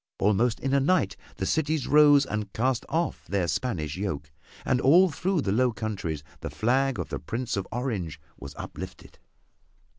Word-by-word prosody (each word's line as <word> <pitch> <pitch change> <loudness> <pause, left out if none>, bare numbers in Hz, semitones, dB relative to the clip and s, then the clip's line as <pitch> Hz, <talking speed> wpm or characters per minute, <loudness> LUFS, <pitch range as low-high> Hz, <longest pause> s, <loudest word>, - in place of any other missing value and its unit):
Almost 110 +3 +2
in 135 0 -1
a 140 - +5
night 140 - +2 0.2
the - - -2
cities 155 -2 0
rose 145 -1 +6
and 105 -4 -4
cast 125 0 0
off 165 +1 -2
their 95 -3 0
Spanish 85 - -2
yoke, 75 -8 -4 0.3
and 130 -1 +2
all 175 +6 +6
through 175 +3 0
the 100 - -1
Low 125 +4 +3
Countries 95 -10 -4 0.2
the - - -5
flag 130 +3 +1
of - - -4
the - - -4
Prince 120 +2 -3
of 100 -1 -3
Orange 105 - -3 0.2
was 70 0 -10
uplifted. - - -9
120 Hz, 170 wpm, -27 LUFS, 100-140 Hz, 0.3 s, rose